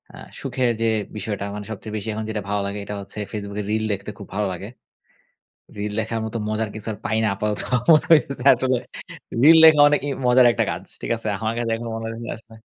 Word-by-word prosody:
আ - - -12 0.2
সুখের 125 -1 0
যে 115 - +2 0.3
বিষয়টা, 105 -1 -3
মানে 105 0 -6
সবচেয়ে 110 +1 -6
বেশি 105 +1 -4
এখন 110 +1 -4
যেটা 105 -1 -3
ভালো 105 0 0
লাগে, 100 +1 -4
এটা 105 - -5
হচ্ছে 100 +2 -7
Facebook 100 -1 -6
এ - - -8
রিল 110 0 0
দেখতে 100 +1 -6
খুব 100 - -9
ভালো 105 0 0
লাগে। 95 +3 -7 1.1
রিল 105 0 -3
দেখার 115 +1 -3
মতো 110 - -5
মজার 110 0 -1
কিছু 110 0 -7
আর 105 - -9
পাই 110 +2 0
না। - - +3
আপাতত 105 +1 -2 0.3
মনে 155 - +4
হইতেছে 140 -4 +3
আসলে 130 0 0 0.6
রিল 160 +3 +8
দেখা 155 -2 +8
অনেকেই 145 -1 0 0.2
মজার 125 0 +6
একটা 115 -1 +1
কাজ। 85 +3 -7 0.2
ঠিক - - -4
আছে? 110 -1 -4
আমার 110 0 -1
কাছে 120 -1 -1
এখনো 115 +1 -6
মনে 115 0 -5
হয় 115 0 -7
না, - - -4
আসলে 110 0 -16
110 Hz, 220 wpm, -22 LUFS, 105-120 Hz, 1.1 s, রিল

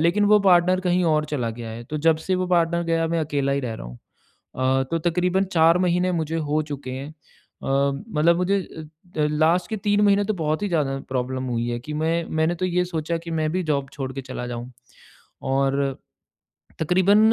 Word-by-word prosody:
लेकिन 175 +6 +3
वो 210 0 +6
पार्टनर 185 -1 +4
कहीं 180 -1 +1
और 155 -2 +2
चला 120 -5 -1
गया 115 -1 -6
है 115 +1 -7
तो 155 - -5
जब 160 - +5
से 190 - +2
वो 185 0 0
पार्टनर 170 -1 +2
गया 165 0 +1
मैं 165 0 0
अकेला 140 -2 0
ही 140 - 0
रह 120 -4 -4
रहा - - -8
हूँ। - - -10 0.6
अ, 130 +1 +2
तो 165 - +1
तकरीबन 180 +2 +1
4 165 +2 +5
महीने 180 0 +1
मुझे 165 -1 -1
हो 155 +1 +2
चुके 135 -2 -6
हैं। 135 +3 -5
अ, - - -13 0.5
मतलब 150 +5 +1
मुझे 195 +2 +1
अ 160 +1 -10
अ, 150 - +3
लास्ट 160 +4 +2
के 220 - -1
3 205 0 +1
महीने 200 0 +4
तो 215 - -1
बहुत 155 +1 -1
ही 205 - 0
ज़्यादा 140 -5 0
प्रॉब्लम 130 0 -2
हुई 120 0 -1
है 120 0 -2
कि 150 +4 -7
मैं 165 +2 0
मैंने 160 +2 +2
तो 185 - -3
ये 180 0 +1
सोचा 165 -1 -2
कि 170 0 -9
मैं 155 - 0
भी 185 0 0
जॉब 140 -1 -1
छोड़ 135 -2 -5
के 135 - -5
चला 130 -1 -6
जाऊँ। 120 +1 -6 0.7
और, 135 0 0 0.8
तकरीबन 185 +5 +4
160 Hz, 210 wpm, -23 LUFS, 135-180 Hz, 0.8 s, वो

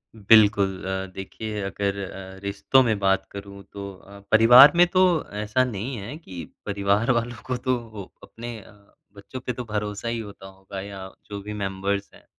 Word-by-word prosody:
बिल्कुल 100 -3 +4
अ, 95 0 -2
देखिए 105 +2 -6
अगर 100 0 -2
अ, 95 0 -10
रिश्तों 100 +7 +3
में 110 -4 +1
बात 95 0 +2
करूँ 100 0 -9
तो 100 -1 -6
अ, 100 +2 -15
परिवार 120 +5 +9
में 175 +1 +7
तो 185 - +4 0.4
ऐसा 105 +5 +1
नहीं 125 +1 -4
है 110 +7 -7
कि 90 - -9 0.2
परिवार 100 +4 +1
वालों 120 0 -2
को 130 -1 -1
तो 115 -5 -2 0.2
अपने 120 0 -8
अ, - - -17 0.4
बच्चों 100 +6 -9
पे 125 0 -4
तो 125 - -5
भरोसा 105 0 -4
ही 115 0 -2
होता 100 -3 -9
होगा 95 0 -9
या 95 -1 -8 0.2
जो 100 -1 -7
भी 105 +1 -7
मेंबर्स 100 0 -2
हैं। - - -19
100 Hz, 175 wpm, -24 LUFS, 100-115 Hz, 0.4 s, परिवार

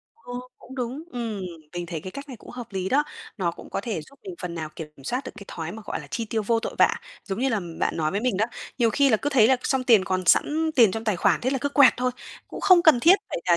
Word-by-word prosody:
Ờ, 245 - -10 0.2
cũng 265 - -12
đúng. 255 +3 -4
Ừm, 230 -4 -4 0.3
mình 175 0 -4
thấy 165 -1 -5
cái 185 - -7
cách 280 +5 -9
này 255 - -8
cũng - - -14
hợp 245 -1 -7
lý 190 -1 -2
đó, 290 +6 +3 0.3
nó 180 -4 0
cũng - - -13
có - - -2
thể 205 -5 -3
giúp 275 - -18
mình 380 -3 -7
phần 175 -1 -4
nào 160 -2 -4
kiểm 160 -2 -6 0.2
soát 250 - -1
được - - -6
cái 200 - -10
thói 165 0 -5
mà 220 0 -9
gọi - - -3
là - - -11
chi 230 - -2
tiêu 220 0 -2
vô 225 +2 +1
tội - - -5
vạ, - - +5 0.3
giống 195 0 -4
như 265 +2 +1
là 220 -5 0 0.2
bạn - - 0
nói 155 -1 0
với 200 - -1
mình 245 -5 0
đó. 215 - +2 0.3
Nhiều 235 -2 +3
khi 280 +4 +3
là 220 - +4
cứ 285 +7 -2
thấy 240 -6 +5
là 260 - +5
xong 265 -1 0
tiền 220 -6 +5
còn 185 0 -1
sẵn 315 - +3
tiền 230 -6 +7
trong 225 +2 -4
tài 215 -4 +1
khoản, - - +2
thế 255 - 0
là 270 - 0
cứ 285 - 0
quẹt 280 -3 +6
thôi. 250 0 0 0.4
Cũng - - -7
không 365 -3 +6
cần 315 -8 +6
thiết 345 +9 +7
phải - - -3
là 170 - +6
230 Hz, 295 wpm, -25 LUFS, 190-265 Hz, 0.4 s, tiền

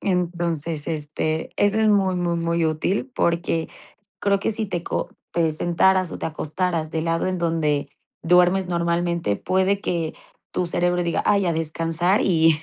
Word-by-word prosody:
Entonces, 170 -4 -1
este, 155 0 -2
eso 205 +1 +2
es 220 - +3
muy, 195 -3 +3
muy, 175 -1 0
muy 170 0 0
útil, 170 - -1
porque 170 -1 0 0.5
creo 200 -1 +1
que - - 0
si 220 0 -2
te 175 -4 -3
co - - -3 0.2
te 165 -2 +1
sentaras 175 +3 +2
o - - -6
te - - -3
acostaras 160 +1 -2
del 160 0 -2
lado 165 0 0
en 185 -1 -2
donde 155 -4 0 0.3
duermes 180 +2 +4
normalmente, 170 - 0
puede 190 +2 +1
que 170 -5 -2 0.4
tu 180 - -1
cerebro 175 +1 +1
diga: 170 - 0
"Ay, 200 -2 +3
a 170 - +2
descansar", 165 +4 +1
y 160 -3 +3
170 Hz, 160 wpm, -23 LUFS, 160-185 Hz, 0.5 s, duermes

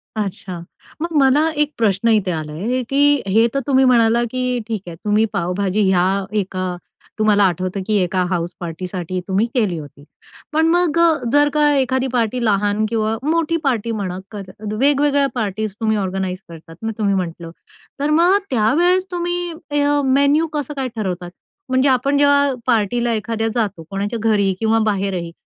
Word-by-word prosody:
अच्छा. 195 -4 -4 0.4
मग 335 0 -3
मला 280 +4 +4
एक 295 - +1
प्रश्न 220 0 +1
इथे 200 -4 +1
आला 155 -2 -4
आहे 240 +10 -2
की 285 0 +3
हे 225 +4 +4
तर 275 - +1
तुम्ही 265 -1 +4
म्हणाला 235 -1 +4
की 250 -1 -1
ठीक 220 -4 -3
आहे, 170 - -7
तुम्ही 210 +5 +1
पावभाजी 190 +4 -1
ह्या 190 +1 +1
एका 185 -2 -3 0.4
तुम्हाला 210 -1 +4
आठवतं 185 +1 0
की 215 - +1
एका 185 0 0
हाउसपार्टीसाठी 175 +1 -4
तुम्ही 195 +3 +1
केली 210 -9 0
होती. 145 -2 -11 0.5
पण 320 +1 +3
मग 340 -1 +2
अ, 340 - +6 0.3
जर 290 0 +5
का 300 -1 +3
एखादी 260 -1 +1
पार्टी 240 0 0
लहान 205 0 +1
किंवा 220 0 -1
मोठी 330 +1 +1
पार्टी 235 -5 0
म्हणा 190 -4 -3
कर 205 -2 -6 0.4
वेगवेगळ्या 285 +2 +3
पार्टीज 215 -2 -3
तुम्ही 220 -1 +1
ऑर्गनाइज 190 -1 -2
करतात, 165 0 -12
मग 225 - -1
तुम्ही 200 -2 +1
म्हटलं. 170 -2 -4 0.5
तर 290 +1 0
मग 345 +6 +4
त्या 220 -1 +2
वेळेस 365 +2 +3
तुम्ही 350 0 -2 0.2
ह्य 290 0 +2
मेन्यू 285 +4 +3
कसं 295 -1 -3
काय 270 -2 -3
ठरवतात? 180 -5 -4 0.4
म्हणजे 260 +2 +3
आपण 275 +2 +2
जेव्हा 285 0 +4
अ, - - -1
पार्टीला 235 +1 +1
एखाद्या 225 0 -2
जातो, 205 -8 -2
कोणाच्या 205 +4 -3
घरी 200 -2 +2
किंवा 225 0 +2
बाहेरही, 190 -4 -3
220 Hz, 165 wpm, -19 LUFS, 190-275 Hz, 0.5 s, अ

